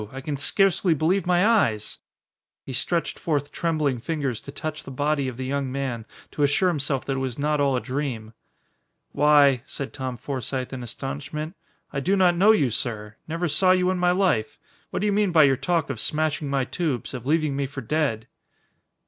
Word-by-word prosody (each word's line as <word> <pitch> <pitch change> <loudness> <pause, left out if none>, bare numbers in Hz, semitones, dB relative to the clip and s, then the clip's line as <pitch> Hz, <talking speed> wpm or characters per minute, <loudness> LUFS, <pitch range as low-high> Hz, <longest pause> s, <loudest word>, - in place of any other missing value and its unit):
I 135 - -7
can 145 +2 -3
scarcely 180 +3 +2
believe 175 +6 +1
my 180 +1 +4
eyes!" 115 - +2 0.7
He 135 - -6
stretched 170 +6 -1
forth 145 -3 -1
trembling 155 -6 0
fingers 140 -4 -2
to 140 - -9
touch 155 +1 -5
the - - -9
body 145 +1 0
of 125 -2 -5
the 130 - -4
young 135 0 -2
man 130 -5 -3 0.2
to - - -4
assure 145 +6 +3
himself 140 -5 -1
that 135 -1 -1
it - - -1
was 130 -2 -3
not 150 0 +1
all 140 -2 +2
a - - +1
dream. 125 -5 -4 0.8
"Why," 145 -3 +5
said 140 - -6
Tom 130 -3 -4
Forsythe, 130 0 -4
in 130 - -5
astonishment. 140 - -5 0.4
"I 140 - -1
do 190 +8 +1
not 180 -2 +4
know 195 +5 +4
you, 150 - +4
sir. 105 -2 -3
Never 165 +2 -1
saw 185 +4 +4
you 185 0 +2
in 185 - -2
my 180 0 +3
life. 175 - +1 0.3
What - - -3
do - - 0
you 205 - +2
mean 205 -2 +2
by 160 -2 +6
your 135 -2 +5
talk 165 +1 0
of 120 - -5
smashing 155 +1 0
my 135 -2 +1
tubes, 145 -5 -3
of 125 -1 -6
leaving 155 -2 +1
me 140 0 -1
for 135 0 -7
dead?" 120 -3 -1
145 Hz, 200 wpm, -24 LUFS, 130-165 Hz, 0.8 s, by